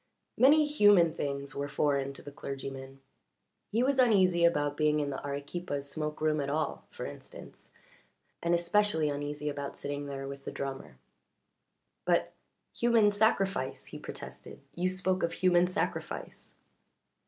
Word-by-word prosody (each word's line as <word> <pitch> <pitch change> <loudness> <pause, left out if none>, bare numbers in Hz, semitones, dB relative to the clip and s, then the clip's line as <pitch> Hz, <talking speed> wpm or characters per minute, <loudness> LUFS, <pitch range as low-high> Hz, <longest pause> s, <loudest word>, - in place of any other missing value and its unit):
Many 300 +4 +6
human 205 - +5
things 140 -1 -3
were 140 0 -3
foreign 140 -1 0
to - - -10
the 145 - -8
clergyman: 135 -1 -7 0.7
he 230 +3 +2
was 270 0 +2
uneasy 190 -8 +4
about 145 -4 +3
being 150 0 +2
in 145 -1 -1
the 135 - -5
Arequipa's 145 +1 -4
smoke 150 0 -4
room 155 -1 +2
at 140 - -3
all, 155 +2 -2
for - - -7
instance, 70 - -11 0.7
and 170 0 +2
especially 170 -2 +2
uneasy 145 +1 -4
about 140 -1 -4
sitting 145 0 -4
there 135 -1 -5
with 140 0 -8
the - - -5
drummer. 135 -1 -6 1.1
"But - - +1 0.4
human 230 -3 +4
sacrifice!" 195 - +1
he - - -9
protested. - - -9
"You 180 +2 0
spoke 185 0 -1
of 170 - 0
human 180 -1 +3
sacrifice." 180 - -4
150 Hz, 140 wpm, -30 LUFS, 140-185 Hz, 1.1 s, Many